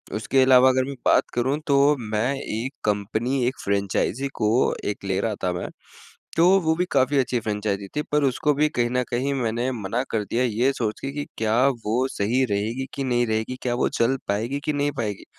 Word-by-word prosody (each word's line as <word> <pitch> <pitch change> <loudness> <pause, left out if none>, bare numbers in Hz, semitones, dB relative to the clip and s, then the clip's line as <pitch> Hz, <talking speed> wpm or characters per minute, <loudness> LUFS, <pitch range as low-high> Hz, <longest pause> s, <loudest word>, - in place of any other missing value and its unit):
उसके 110 +5 +2
अलावा 130 0 +6
अगर 130 0 +2
मैं 140 0 -6
बात - - +5
करूँ 130 +4 0
तो 140 +1 +4
मैं 110 +4 -1
एक 130 0 -4
कंपनी 110 +5 0
एक 130 - -1
फ्रेंचाइज़ी 100 +6 0
को 105 -2 +1 0.4
एक 105 - -5
ले 95 -1 0
रहा 110 -2 -1
था 90 - +1
मैं 90 - -4 0.7
तो 170 +1 +5
वो 160 -2 +1
भी 180 - +1
काफ़ी 135 +1 +3
अच्छी 125 -1 +1
फ्रेंचाइज़ी 105 -2 -2
थी 150 - +1
पर 150 - +3
उसको 140 +3 +1
भी 150 +2 +2
कहीं 120 -5 -1
न 125 0 +1
कहीं 130 +4 0
मैंने 120 0 -1
मना 115 +1 -2
कर 105 -2 -1
दिया 120 +5 0
ये 120 +3 +1
सोच 110 -5 -3
के 135 0 -4
कि 145 0 -4
क्या 110 0 +1 0.3
वो 120 +5 +1
सही 120 +6 +1
रहेगी 110 +6 -1
कि 140 - -3
नहीं 120 -2 +1
रहेगी? 110 +3 -2
क्या 120 -1 0
वो - - +1
चल 120 +3 +1
पाएगी 115 +8 -1
कि 150 - 0
नहीं 145 0 0
पाएगी? 105 -4 -3
120 Hz, 205 wpm, -24 LUFS, 110-135 Hz, 0.7 s, अलावा